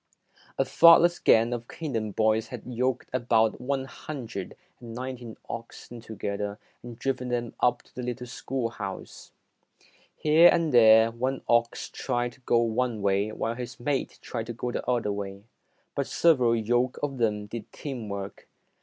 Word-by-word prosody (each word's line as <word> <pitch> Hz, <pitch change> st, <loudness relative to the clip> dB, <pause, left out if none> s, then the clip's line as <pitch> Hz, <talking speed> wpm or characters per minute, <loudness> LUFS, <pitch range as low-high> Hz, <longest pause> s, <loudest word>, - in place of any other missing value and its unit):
A -, -, +2 dB
thoughtless 170 Hz, +1 st, +6 dB
gang 115 Hz, +2 st, +4 dB
of 120 Hz, 0 st, -5 dB
Canaan 115 Hz, -10 st, -3 dB
boys 110 Hz, +1 st, +1 dB
had 120 Hz, -1 st, -8 dB
yoked 125 Hz, +1 st, -1 dB
about 115 Hz, -3 st, +2 dB
one 135 Hz, +1 st, -1 dB
hundred 120 Hz, -9 st, -7 dB, 0.2 s
and 115 Hz, -1 st, -9 dB
ninety 125 Hz, -2 st, -6 dB
oxen 115 Hz, +1 st, -8 dB
together 100 Hz, -2 st, -4 dB, 0.2 s
and 120 Hz, -2 st, -10 dB
driven 125 Hz, -1 st, -2 dB
them 120 Hz, -1 st, -2 dB
up 120 Hz, 0 st, +2 dB
to -, -, -26 dB
the 125 Hz, -, -6 dB
little 125 Hz, 0 st, -4 dB
schoolhouse. 115 Hz, -6 st, -5 dB, 0.9 s
Here 160 Hz, +3 st, +6 dB
and 165 Hz, -4 st, +1 dB
there, 110 Hz, -1 st, +7 dB
one 130 Hz, +3 st, -2 dB
ox 120 Hz, 0 st, +1 dB
tried 120 Hz, -2 st, -2 dB
to 130 Hz, -, -20 dB
go 120 Hz, -, +2 dB
one 115 Hz, -1 st, -1 dB
way 100 Hz, +2 st, +1 dB
while 115 Hz, +1 st, -2 dB
his 120 Hz, 0 st, -7 dB
mate 135 Hz, +2 st, -2 dB
tried 115 Hz, -2 st, -4 dB
to 120 Hz, -, -4 dB
go 120 Hz, +1 st, -4 dB
the -, -, -3 dB
other 120 Hz, -4 st, +1 dB
way, 100 Hz, -1 st, -5 dB, 0.5 s
but -, -, -2 dB
several 130 Hz, -9 st, +3 dB
yoke 120 Hz, +3 st, +1 dB
of 135 Hz, -3 st, -2 dB
them 105 Hz, -3 st, 0 dB
did 105 Hz, +1 st, -8 dB
team 125 Hz, -7 st, -6 dB
work. 100 Hz, 0 st, -6 dB
120 Hz, 160 wpm, -27 LUFS, 110-125 Hz, 0.9 s, there